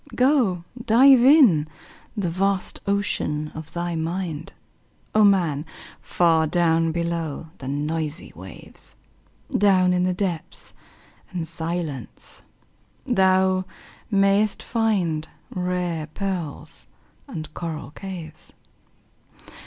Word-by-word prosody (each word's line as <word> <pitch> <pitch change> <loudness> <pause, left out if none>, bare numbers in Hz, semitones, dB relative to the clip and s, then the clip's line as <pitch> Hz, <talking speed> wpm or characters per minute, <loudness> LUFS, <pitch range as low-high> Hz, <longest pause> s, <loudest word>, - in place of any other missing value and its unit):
Go, 250 - +3 0.2
dive 250 +3 +6
in 250 - +6 0.5
the 200 -4 0
vast 195 +2 0
ocean 175 -7 -1
of 160 -1 -9
thy 175 0 -2
mind, 165 -1 -3 0.6
O 215 - +5
man! 175 -8 +3 0.4
far 165 -2 +2
down 165 -1 +2
below 170 -2 -3
the 130 - -7
noisy 150 +3 -3
waves, 95 +3 -11 0.6
Down 185 -3 +4
in 180 - +1
the 180 0 +1
depths 180 -5 -4 0.6
and 170 -3 -4
silence 165 -4 -5 0.6
thou 190 -5 +3 0.4
mayst 200 0 +2
find 185 -9 0 0.2
Rare 180 -3 -2
pearls 175 -3 -5 0.4
and 155 -1 -7
coral 160 -4 -5
caves. 175 -3 -9
175 Hz, 95 wpm, -23 LUFS, 160-195 Hz, 0.6 s, dive